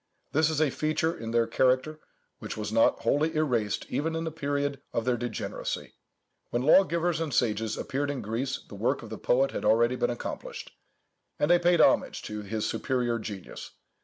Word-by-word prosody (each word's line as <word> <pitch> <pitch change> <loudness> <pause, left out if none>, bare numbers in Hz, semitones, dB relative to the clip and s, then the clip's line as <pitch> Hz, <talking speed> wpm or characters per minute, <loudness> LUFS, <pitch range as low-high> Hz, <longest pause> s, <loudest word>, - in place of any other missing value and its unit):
This 155 +1 +3
is 155 -2 -1
a 155 -3 +3
feature 155 +3 0
in 115 - -6
their 115 0 +2
character 130 +6 +1 0.4
which - - -6
was 105 -1 -4
not 115 0 +3
wholly 145 +8 +1
erased 120 -10 0
even 160 +2 -1
in 165 - -2
the 160 - -3
period 145 -2 -2
of 115 - -1
their 125 -1 +2
degeneracy. 120 0 -4 0.6
When 120 +1 -1
lawgivers 170 +1 +4
and 160 -3 -2
sages 110 -3 0
appeared 140 +1 -2
in 135 -5 -3
Greece, 120 +6 -3
the - - -13
work 115 +7 -1
of 115 - -10
the 110 - -6
poet 135 +2 +2
had - - -4
already 120 +3 +4
been 120 - 0
accomplished; 120 - -6 0.7
and 150 - +2
they 175 - +6
paid 175 0 +4
homage - - +3
to 105 0 -5
his 105 +1 -3
superior 120 -3 -1
genius. 105 -4 -8
130 Hz, 185 wpm, -28 LUFS, 115-155 Hz, 0.7 s, they